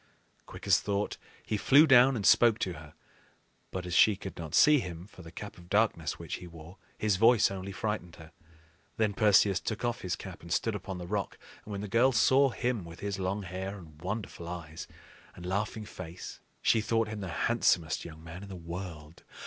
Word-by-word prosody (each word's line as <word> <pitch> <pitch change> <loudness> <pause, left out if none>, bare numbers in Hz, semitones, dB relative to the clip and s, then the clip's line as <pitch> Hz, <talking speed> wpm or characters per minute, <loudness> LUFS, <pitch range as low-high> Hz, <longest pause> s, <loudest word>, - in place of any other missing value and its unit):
Quick - - -10
as - - +5
thought, 100 0 -2 0.3
he 105 - -1
flew 140 +8 +6
down 135 -2 +6
and 105 -4 -3
spoke 115 -2 +6
to 90 - -2
her; 75 -2 -12 0.7
but, 90 -1 -5
as 90 - -5
she 105 +4 +6
could 95 0 -8
not 80 -4 -5
see 150 -1 +6
him 90 -5 -6
for 95 - -15
the 80 -1 -11
Cap 100 +1 -9
of 85 0 -16
Darkness 100 -7 +1
which 85 -3 -5
he 90 - -10
wore, 85 +2 -13 0.2
his 105 -3 +1
voice 115 0 +5
only 95 0 -5
frightened 95 -5 -4
her. 80 0 -13 0.7
Then 110 -2 +1
Perseus 100 -2 +4
took 110 +2 -3
off 120 -1 -2
his 90 -3 -2
cap, 95 +1 -10
and 85 - -11
stood 115 +5 +1
upon 95 -2 -5
the 90 - -6
rock; 100 +2 -3 0.3
and 105 - -9
when 100 -1 -4
the 105 - -5
girl 120 +6 +4
saw 130 +3 +4
him 120 -4 -2
with 85 0 -11
his 100 -1 -3
long 95 +2 -2
hair 95 +2 -5
and 80 -5 -14
wonderful 95 -3 -5
eyes 85 -3 -7 0.5
and 90 - -10
laughing 105 +4 -2
face, 90 -3 -9 0.2
she 110 - +4
thought 115 +1 +1
him 110 0 -5
the 95 -2 -5 0.2
handsomest 85 -8 +1
young 80 -1 -10
man 85 +2 -9
in 100 - -10
the 95 - -7
world. 85 -2 -8
95 Hz, 205 wpm, -30 LUFS, 85-110 Hz, 0.7 s, flew